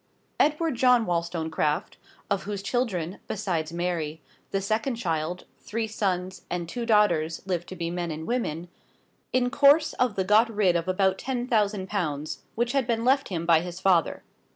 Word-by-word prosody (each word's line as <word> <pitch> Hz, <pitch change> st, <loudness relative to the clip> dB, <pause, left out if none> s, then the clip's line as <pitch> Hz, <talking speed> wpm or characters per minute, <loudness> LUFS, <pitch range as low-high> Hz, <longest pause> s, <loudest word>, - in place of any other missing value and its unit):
Edward 310 Hz, +1 st, +2 dB
John 250 Hz, -2 st, +4 dB
Wollstonecraft 165 Hz, -3 st, -1 dB, 0.3 s
of 200 Hz, -1 st, +1 dB
whose 200 Hz, -1 st, -4 dB
children, 200 Hz, -7 st, -1 dB
besides 175 Hz, -7 st, -2 dB
Mary, 170 Hz, -3 st, -2 dB, 0.3 s
the 195 Hz, -, 0 dB
second 220 Hz, +6 st, -1 dB
child, 170 Hz, -4 st, -2 dB
three 225 Hz, +1 st, -3 dB
sons 185 Hz, -4 st, -2 dB
and 175 Hz, -1 st, -3 dB
two 235 Hz, +7 st, -4 dB
daughters 170 Hz, -7 st, +2 dB
lived 175 Hz, -2 st, -2 dB
to 185 Hz, -, -7 dB
be 170 Hz, -1 st, -3 dB
men 175 Hz, -1 st, -3 dB
and 160 Hz, 0 st, -5 dB
women 175 Hz, -9 st, -2 dB, 0.6 s
in 245 Hz, -1 st, +1 dB
course 290 Hz, +3 st, +5 dB
of 250 Hz, -4 st, 0 dB
time 190 Hz, -, 0 dB
got 215 Hz, +4 st, +5 dB
rid 205 Hz, -5 st, +2 dB
of 170 Hz, +1 st, -1 dB
about 190 Hz, 0 st, +2 dB
ten 250 Hz, -2 st, -2 dB
thousand 210 Hz, -5 st, +1 dB
pounds, 155 Hz, -7 st, -3 dB
which 240 Hz, +1 st, 0 dB
had 270 Hz, -3 st, +1 dB
been 230 Hz, -1 st, 0 dB
left 275 Hz, +2 st, +3 dB
him 170 Hz, -3 st, -3 dB
by 165 Hz, -1 st, +5 dB
his 175 Hz, 0 st, -6 dB
father. 180 Hz, -5 st, +2 dB
190 Hz, 170 wpm, -26 LUFS, 170-230 Hz, 0.6 s, course